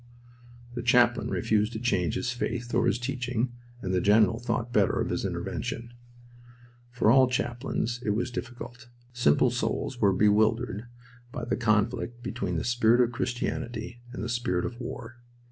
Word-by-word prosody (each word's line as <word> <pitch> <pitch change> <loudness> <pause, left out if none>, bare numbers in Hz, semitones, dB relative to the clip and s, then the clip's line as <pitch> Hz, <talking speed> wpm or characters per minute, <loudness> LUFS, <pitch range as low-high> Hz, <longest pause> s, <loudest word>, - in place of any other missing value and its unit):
The 120 - -3
chaplain 120 0 +3
refused 105 +1 +1
to 110 - -4
change 90 -9 0
his 125 - -1
faith 120 0 -3
or - - +3
his - - +2
teaching, 125 -1 -2 0.3
and 95 -1 -2
the 90 - +2
general 110 +3 +4
thought 120 0 -2
better 100 -4 +3
of - - -1
his - - -1
intervention. 120 +1 -4 1.0
For 120 -3 +3
all 130 0 +6
chaplains 120 -1 -2
it - - -1
was 120 +2 -1
difficult. 120 0 -7 0.3
Simple 120 -12 +3
souls 125 - -2
were 100 -2 +5
bewildered 110 +3 +2 0.4
by 120 - -5
the - - 0
conflict 120 +1 0
between 90 -8 -3
the 80 - -1
spirit 120 -1 +3
of 120 -1 +4
Christianity 120 -1 -3
and 125 - -5
the - - -2
spirit 115 -7 -1
of 120 - -5
war. 120 -1 -7
120 Hz, 160 wpm, -28 LUFS, 110-120 Hz, 1.0 s, all